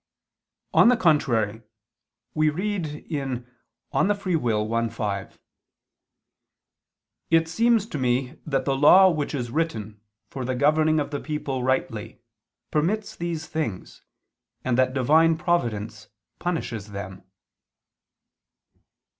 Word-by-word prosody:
On - - +6
the 250 0 +5
contrary, 120 - +2 0.7
We 155 0 +3
read 185 +2 -2 0.2
in 135 -6 -3 0.5
De - - +1
Lib. 205 +1 +2
Arb. 115 - 0
i, - - -6
5: 105 -3 -4 1.9
"It 165 0 +3
seems 230 +5 +2
to 215 -10 -5
me 125 +1 -1
that 135 -3 -1
the 135 - +1
law 185 +7 +7
which 150 -2 -2
is 120 -3 -4
written 110 -10 -3 0.3
for 135 - -6
the 130 +1 -2
governing 155 +3 +3
of 145 - -3
the 145 - -2
people 145 -4 -3
rightly 115 -4 -2 0.5
permits 190 +8 0
these 170 -2 -4
things, 150 - -5 0.6
and 130 -2 +1
that 130 +1 +2
Divine 155 +5 +4
providence 110 - -2 0.3
punishes 115 - -3
them." 95 -1 -7
140 Hz, 115 wpm, -25 LUFS, 115-165 Hz, 1.9 s, law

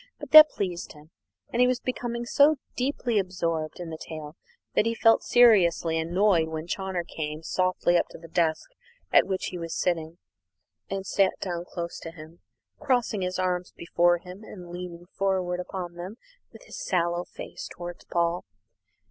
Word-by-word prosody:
But - - -9
that 310 0 +11
pleased 180 -8 -4
him, 150 +2 -17 0.4
and 240 - +2
he 250 - +6
was 250 -1 +1
becoming 240 -2 -3
so 290 +5 +5 0.2
deeply 250 -4 0
absorbed 165 -4 -2
in 170 -2 -6
the 160 - -7
tale 155 -1 -8 0.4
that 220 - +2
he 230 - 0
felt 225 0 +5
seriously 175 -9 +4
annoyed 175 0 +2
when 160 0 -5
Chawner 190 0 -3
came 155 -1 -5
softly 185 0 +1
up - - -1
to - - -11
the 165 - -12
desk 165 -1 0 0.5
at - - +6
which 190 -1 -2
he 180 - -6
was 165 -1 -5
sitting, 165 -2 -1 0.7
and 195 0 -3
sat 195 0 +2
down 175 -2 -4
close 170 -1 -6
to - - -7
him, 160 0 -13 0.4
crossing 240 -6 0
his 185 0 -2
arms 180 -1 -1
before 175 +1 +2
him, 180 +4 -11
and 180 -5 -10
leaning 175 -1 -7
forward 185 -2 0
upon 180 -1 -5
them 180 +4 -7 0.4
with - - -14
his - - -8
sallow 175 -1 0
face - - -9
towards 175 0 -8
Paul. 170 +1 0
180 Hz, 170 wpm, -26 LUFS, 170-195 Hz, 0.7 s, that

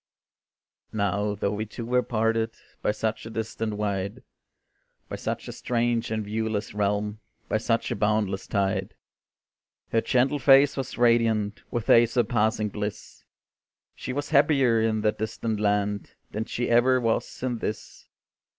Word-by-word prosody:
Now, 100 0 0
though 100 0 -1
we 105 +1 -3
two 115 +2 -7
were 125 +1 +2
parted 115 -1 0 0.3
By - - 0
such 110 +1 -3
a - - -7
distance 110 -1 -3
wide, 100 -2 -3 0.9
By - - -4
such - - -4
a - - -5
strange 120 -1 -1
and 110 -1 -2
viewless 110 0 -2
realm, 105 +1 -1 0.3
By 110 - 0
such 115 +1 0
a - - 0
boundless 105 -2 0
tide, 100 -2 -1 1.0
Her 115 - +3
gentle 130 +5 +2
face 135 +1 +6
was 135 -2 -4
radiant 115 -3 +2
With 120 -2 -3
a 120 0 +7
surpassing 110 -2 +1
bliss; 105 0 -6 0.7
She - - -6
was 145 +3 -3
happier 135 -6 +4
in 110 -1 +1
that 105 0 0
distant 110 0 -2
land, 105 -1 0 0.2
Than 110 +1 -3
she 120 - -2
ever 125 +2 +4
was 115 +1 -1
in 125 -3 -1
this. 105 0 -6
110 Hz, 145 wpm, -26 LUFS, 105-120 Hz, 1.0 s, a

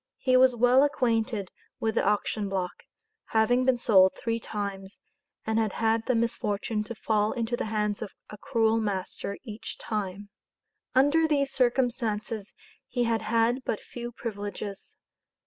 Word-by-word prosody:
He 255 -1 +2
was 255 -1 +6
well 245 +3 +5
acquainted 230 -8 0 0.3
with 220 0 0
the - - +1
auction 205 0 0
block 185 -2 -2 0.5
having 245 +3 +2
been 260 -1 +3
sold 190 -6 +5
three 230 -1 -2
times, 200 -3 -5 0.5
and 220 0 +1
had 220 -3 0
had 225 0 +1
the 255 - +2
misfortune 215 -2 -1
to 235 +2 -6
fall 215 -1 +1
into 240 -1 -1
the - - -3
hands 210 -1 -1
of 215 - -4 0.2
a - - -7
cruel 225 -3 +2
master 200 -1 -3
each 220 -3 -7
time. 205 -1 -4 0.7
Under 290 +5 +4
these 280 -3 +1
circumstances 235 -4 0 0.4
he 245 - 0
had 230 -1 +1
had 230 +3 +1
but 220 - -2
few 240 0 -7
privileges. 205 -3 -6
225 Hz, 145 wpm, -28 LUFS, 210-245 Hz, 0.7 s, was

